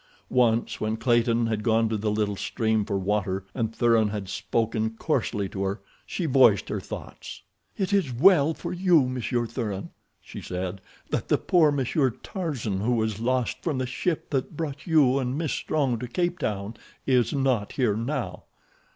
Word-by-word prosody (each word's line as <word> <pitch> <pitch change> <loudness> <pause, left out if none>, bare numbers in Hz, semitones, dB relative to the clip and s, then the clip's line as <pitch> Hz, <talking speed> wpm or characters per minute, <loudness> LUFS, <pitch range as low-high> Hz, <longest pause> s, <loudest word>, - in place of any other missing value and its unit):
Once, 120 -2 +2
when 110 +1 -1
Clayton 120 0 +2
had 110 -2 -1
gone 115 0 +2
to 110 - -1
the 105 0 -1
little 105 -1 0
stream 110 +1 0
for 100 -2 -1
water, 95 -1 -1
and 115 -3 -1
Thuran 115 -2 +3
had 100 -2 -5
spoken 110 +1 -1
coarsely 115 -9 -1
to 95 - -5
her, 100 +2 -2 0.3
she 180 - -3
voiced 130 - +4
her - - -2
thoughts. - - -9 0.3
"It 195 -1 -1
is 190 -10 +2
well 155 +3 +5
for - - -5
you, 175 -7 +4
Monsieur 125 -1 -1
Thuran," 110 -4 -4 0.3
she - - -10
said, 90 +1 -4 0.3
"that - - -1
the - - +3
poor 160 -4 +3
Monsieur 135 0 +1
Tarzan 125 - -4
who 115 +5 +1
was 110 -3 0
lost 125 0 0
from 155 -6 -1
the 130 - -1
ship 155 +6 -2
that 140 +2 -2
brought 150 -2 -5
you 140 -5 +4
and 130 +1 -2
Miss 160 -2 -1
Strong 135 -7 0
to 125 - -5
Cape 175 +7 -1
Town 105 -4 -3 0.3
is 125 -3 +3
not 130 -7 0
here 120 -7 +1
now." 125 +4 -3
120 Hz, 175 wpm, -26 LUFS, 110-140 Hz, 0.3 s, well